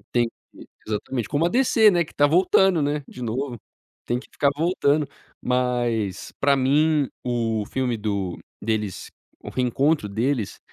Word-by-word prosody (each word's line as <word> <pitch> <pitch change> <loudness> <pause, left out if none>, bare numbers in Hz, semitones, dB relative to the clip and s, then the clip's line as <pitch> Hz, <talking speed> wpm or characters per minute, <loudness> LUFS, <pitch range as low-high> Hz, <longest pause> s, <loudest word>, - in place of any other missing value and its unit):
Tem. 120 -1 +3 0.3
E - - -12 0.2
exatamente, 110 +2 -3
como 150 +3 +1
a - - +2
DC, 230 -3 +5
né, 175 -2 +2
que - - -17
está 145 - +4
voltando, 180 +2 +4
né, 145 0 -1
de 125 - -10
novo, 120 +2 -3 0.5
tem 120 - 0
que - - -15
ficar 140 - +1
voltando. 155 -2 +2 0.4
Mas, 120 -6 -1
pra 140 0 +4
mim, 145 +2 +2 0.2
o 115 -3 -1
filme 125 0 -1
do 100 -4 -2 0.2
deles, 105 -3 -2 0.4
o - - -6
reencontro 130 0 +1
deles, 115 +2 -1
130 Hz, 150 wpm, -23 LUFS, 115-150 Hz, 0.5 s, DC